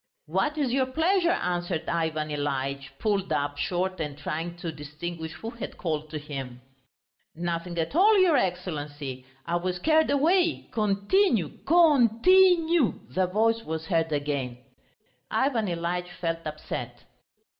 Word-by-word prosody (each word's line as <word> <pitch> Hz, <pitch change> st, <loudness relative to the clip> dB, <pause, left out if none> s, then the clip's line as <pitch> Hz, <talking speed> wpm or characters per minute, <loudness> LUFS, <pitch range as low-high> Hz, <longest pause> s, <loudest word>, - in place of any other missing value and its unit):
"What 190 Hz, -, 0 dB
is 280 Hz, -5 st, 0 dB
your 260 Hz, -1 st, +2 dB
pleasure?" 340 Hz, +6 st, +2 dB
answered 175 Hz, -, -1 dB
Ivan 160 Hz, -2 st, -1 dB
Ilyitch, 140 Hz, -1 st, -3 dB
pulled 200 Hz, -3 st, -1 dB
up 145 Hz, 0 st, -1 dB
short 185 Hz, -1 st, -1 dB
and 150 Hz, -3 st, -4 dB
trying 165 Hz, +4 st, -4 dB
to 170 Hz, -1 st, -4 dB
distinguish 160 Hz, +2 st, -6 dB
who 225 Hz, -, -7 dB
had 235 Hz, -, -7 dB
called 155 Hz, -3 st, -3 dB
to 155 Hz, -, -4 dB
him. 135 Hz, -4 st, -6 dB, 0.8 s
"Nothing 170 Hz, +1 st, -3 dB
at 165 Hz, -, -2 dB
all, 415 Hz, +5 st, +6 dB
your 370 Hz, -5 st, +5 dB
Excellency. 145 Hz, -, -3 dB, 0.2 s
I 170 Hz, +1 st, 0 dB
was 180 Hz, +1 st, -2 dB
carried 315 Hz, -, +3 dB
away, 330 Hz, +4 st, +2 dB
continue! 210 Hz, -, +1 dB
Con 285 Hz, -9 st, +5 dB
ti 375 Hz, -1 st, +7 dB
nue!" 325 Hz, -6 st, +1 dB
the 185 Hz, 0 st, +1 dB
voice 225 Hz, +4 st, +2 dB
was 160 Hz, 0 st, -4 dB
heard 165 Hz, -1 st, 0 dB
again. 140 Hz, -4 st, -2 dB, 0.7 s
Ivan 245 Hz, -6 st, +1 dB
Ilyitch 175 Hz, +1 st, -2 dB
felt 165 Hz, -1 st, -2 dB
upset. 155 Hz, 0 st, -6 dB
175 Hz, 140 wpm, -27 LUFS, 155-250 Hz, 0.8 s, ti